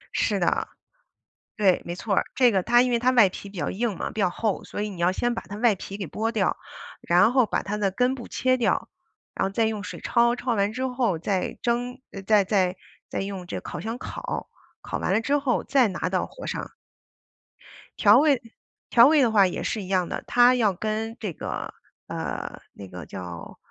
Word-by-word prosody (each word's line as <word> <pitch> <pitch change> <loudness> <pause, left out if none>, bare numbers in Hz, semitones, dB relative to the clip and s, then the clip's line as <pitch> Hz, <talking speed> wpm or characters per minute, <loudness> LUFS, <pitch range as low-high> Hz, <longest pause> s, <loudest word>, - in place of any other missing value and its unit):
是 - - +1
的， - - +1 0.9
对， 195 -4 +3
没 175 - -4
错 200 +1 -2
儿。 - - +3
这 250 -2 +5
个， 195 -4 +2
它 240 +3 +5
因 255 - 0
为 235 - +2
它 255 +2 +2
外 230 -6 +6
皮 195 +2 -9
比 195 - -13
较 - - -2
硬 215 -1 -2
嘛， - - -4
比 215 - -4
较 185 - +3
厚， 210 +2 -2
所 205 - -5
以 210 - -3
你 185 -4 -9
要 175 +2 +3
先 240 +4 0
把 - - -4
它 200 - -9
外 225 -1 +3
皮 195 +2 -7
给 195 -4 -5
剥 225 +6 -2
掉， 205 -5 +1 0.5
然 180 +7 +4
后 255 -4 +4
把 - - -1
它 205 +1 -3
的 205 -2 0
根 250 +5 +1
部 240 - -8
切 255 0 +1
掉， 245 - 0 0.5
然 - - 0
后 - - -2
再 225 +3 +1
用 215 -2 -3
水 - - -7
焯， 235 0 +3
焯 245 -2 -1
完 200 +1 +1
之 260 +2 -2
后 245 -9 0
再 185 +2 -2
蒸， 245 +2 -1 0.3
再 210 -1 +5
再 185 -2 +1 0.3
再 - - -3
用 195 -2 -5
这 - - -5
烤 - - -7
箱 225 +2 -4
烤， - - -5 0.3
烤 - - -4
完 - - -1
了 220 - +3
之 280 +5 +1
后 275 -3 0
再 265 -3 +3
拿 185 - -2
到 - - -1
火 - - -10
上。 - - -5 1.2
调 210 +2 +6
味， 285 -4 +3 0.5
调 235 +2 +7
味 305 -2 +5
的 235 -3 +3
话 200 -3 +5
也 - - -4
是 215 - -2
一 185 - -8
样 185 -2 0
的， - - -4
它 245 +1 +6
要 215 -6 +2
跟 220 +3 -3
这 205 -5 -2
个， - - -5 0.3
呃， - - -5
那 100 -2 -10
个 90 -3 -8
叫 85 +1 -8
215 Hz, 235 characters per minute, -25 LUFS, 195-245 Hz, 1.2 s, 调